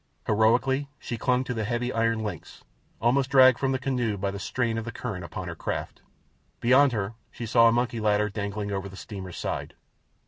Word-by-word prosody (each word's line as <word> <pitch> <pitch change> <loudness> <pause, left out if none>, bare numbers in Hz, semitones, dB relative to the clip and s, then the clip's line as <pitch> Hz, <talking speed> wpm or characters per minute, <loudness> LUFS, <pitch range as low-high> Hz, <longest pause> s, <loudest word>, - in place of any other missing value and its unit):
Heroically 125 +6 +2
she 120 - -5
clung 125 +2 +1
to 125 - -3
the 110 -2 -2
heavy 120 +3 -1
iron 115 -1 +1
links, 100 -7 -7 0.4
almost 130 +3 +2
dragged 130 -2 +6
from 135 -1 +1
the 130 - +1
canoe 125 -5 -1
by 100 +1 -1
the 100 - -6
strain 115 0 -1
of - - -4
the 115 - -4
current 105 -9 -5
upon 90 +1 -6
her 85 - -4
craft. - - -4 0.6
Beyond 130 +3 +5
her 105 -2 -2 0.2
she 120 - -7
saw 115 +1 +5
a - - +5
monkey 120 0 0
ladder 105 -1 +2
dangling 100 0 -4
over 100 0 -3
the 95 - -11
steamer's 95 -5 -8
side. - - -4
115 Hz, 200 wpm, -26 LUFS, 105-125 Hz, 0.6 s, dragged